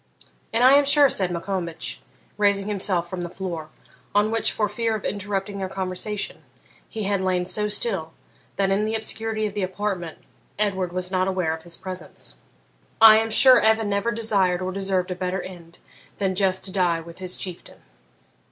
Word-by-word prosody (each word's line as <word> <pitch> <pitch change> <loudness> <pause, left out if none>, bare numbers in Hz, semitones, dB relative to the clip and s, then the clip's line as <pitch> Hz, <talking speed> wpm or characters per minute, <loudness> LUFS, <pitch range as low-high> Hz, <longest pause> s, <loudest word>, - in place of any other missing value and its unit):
'And 230 +2 +1
I 260 +2 +8
am 285 +1 +6
sure,' 285 0 +5
said 185 -2 +1
Maccombich, 175 -1 -4 0.3
raising 200 -1 +2
himself 190 -4 0
from 180 0 -5
the 175 - -4
floor, 170 -4 -6 0.5
on 210 +1 +3
which, 225 0 +1
for 210 - 0
fear 225 +2 -1
of 215 - -6
interrupting 200 0 -3
their 190 -1 -3
conversation, 190 +2 -4 0.5
he 220 - -5
had 200 -1 0
lain 185 -1 0
so 210 +3 +2
still 200 -6 -1 0.4
that, 195 -1 +1
in 205 +2 +1
the 220 +1 -1
obscurity 220 0 -1
of 205 - -3
the 205 - -3
apartment, 185 -3 -3 0.4
Edward 190 -4 -1
was 180 +1 -3
not 185 0 +1
aware 185 -4 0
of 160 - -7
his 170 0 -8
presence 185 - -8 0.7
'I 220 -1 +9
am 225 0 +1
sure 255 +3 +7
Evan 220 -1 +2
never 200 +3 0
desired 205 -6 +1
or 185 0 -3
deserved 190 -1 -1
a - - -2
better 180 0 -3
end 170 -2 -11 0.4
than 195 -2 0
just 190 -1 +1
to 190 - -2
die 180 -3 +1
with 170 +2 -12
his 185 -1 -1
Chieftain.' 180 -3 -7
195 Hz, 180 wpm, -24 LUFS, 180-210 Hz, 0.7 s, I